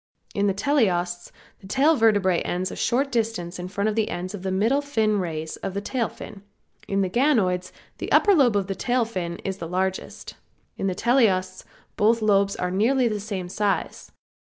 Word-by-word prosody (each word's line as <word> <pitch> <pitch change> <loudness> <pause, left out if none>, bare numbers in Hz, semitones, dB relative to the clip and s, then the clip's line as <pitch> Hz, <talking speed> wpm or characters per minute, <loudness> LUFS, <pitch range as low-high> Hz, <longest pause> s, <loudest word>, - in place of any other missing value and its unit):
In 200 0 +1
the 195 - +2
teleosts 180 -9 0 0.3
the 190 - -13
tail 280 +9 +3
vertebrae 205 - +3
ends 185 +2 -2
a - - -6
short 270 +3 0
distance 220 -7 -2
in 180 - -5
front 200 +2 -2
of 215 +1 0
ends 185 -3 -3
of 205 - -6
the 190 - -3
middle 220 +9 +2
fin 220 -7 0
rays 160 -3 -4
of 190 - -5
the - - 0
tail 235 +2 -2
fin. 195 - -11 0.5
In 195 0 0
the 190 - +1
ganoids 195 -7 +1 0.3
the - - -5
upper 410 - +5
lobe 265 - +4
of 195 - 0
the 195 - -3
tail 245 +4 0
fin 175 -6 -4
is 195 -1 -2
the 165 - -5
largest. 190 +1 -3 0.4
In 195 - -2
the 185 - -1
teleosts 195 -6 +1 0.3
both 225 +2 +3
lobes 200 -1 +3
are 180 0 -2
nearly 240 +7 +2
the 215 -2 -2
same 200 -3 -5
size. 205 +2 -2
200 Hz, 190 wpm, -24 LUFS, 185-230 Hz, 0.5 s, upper